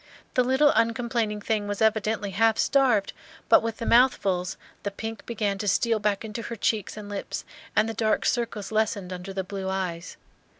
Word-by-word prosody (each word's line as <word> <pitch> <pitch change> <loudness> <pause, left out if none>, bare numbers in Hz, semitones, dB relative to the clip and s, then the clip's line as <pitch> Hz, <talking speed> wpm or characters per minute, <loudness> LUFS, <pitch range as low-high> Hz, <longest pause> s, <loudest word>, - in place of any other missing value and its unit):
The 250 - +3
little 265 +4 +4
uncomplaining 230 -2 0
thing 210 -1 -1
was 205 0 -3
evidently 220 -1 +1
half 225 +3 +3
starved, 250 -8 +3 0.4
but - - +7
with 225 -1 -3
the 230 - -5
mouthfuls 200 -8 +3 0.2
the 200 - -2
pink 225 +2 -6
began 210 -4 -1
to 205 - -3
steal 225 +3 +2
back 210 0 0
into 220 +1 -5
her 235 - -5
cheeks 215 -1 -1
and 210 -1 -7
lips, 205 -1 -5 0.3
and 215 +1 +4
the 225 - -3
dark 220 -1 +1
circles 230 -4 -1
lessened 210 -4 0
under 180 +2 -7
the 190 0 -3
blue 190 0 -5
eyes. 180 -3 -4
215 Hz, 180 wpm, -26 LUFS, 200-230 Hz, 0.4 s, but